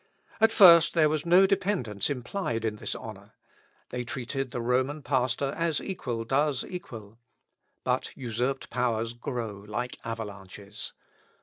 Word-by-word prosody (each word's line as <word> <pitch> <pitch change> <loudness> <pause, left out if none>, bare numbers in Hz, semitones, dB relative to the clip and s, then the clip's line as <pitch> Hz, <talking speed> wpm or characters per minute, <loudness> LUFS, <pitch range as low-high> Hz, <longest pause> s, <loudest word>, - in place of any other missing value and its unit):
At 225 0 +5
first 170 -7 +8
there 155 -2 +5
was 155 +1 -2
no 180 +3 +7
dependence 185 - 0
implied 125 - -2
in 105 -1 -1
this - - -3
honour. - - -10 0.5
They 125 0 -3
treated 130 +2 -4
the 120 - -4
Roman 130 +5 0
pastor 130 +1 0
as 165 -3 0
equal 125 - -4
does 135 +2 +1
equal; 115 - -8 0.6
but - - 0
usurped 125 +2 -2
powers 115 -2 0
grow 115 -4 -5
like 120 +4 -4
avalanches. 105 -2 -6
125 Hz, 130 wpm, -28 LUFS, 115-150 Hz, 0.6 s, first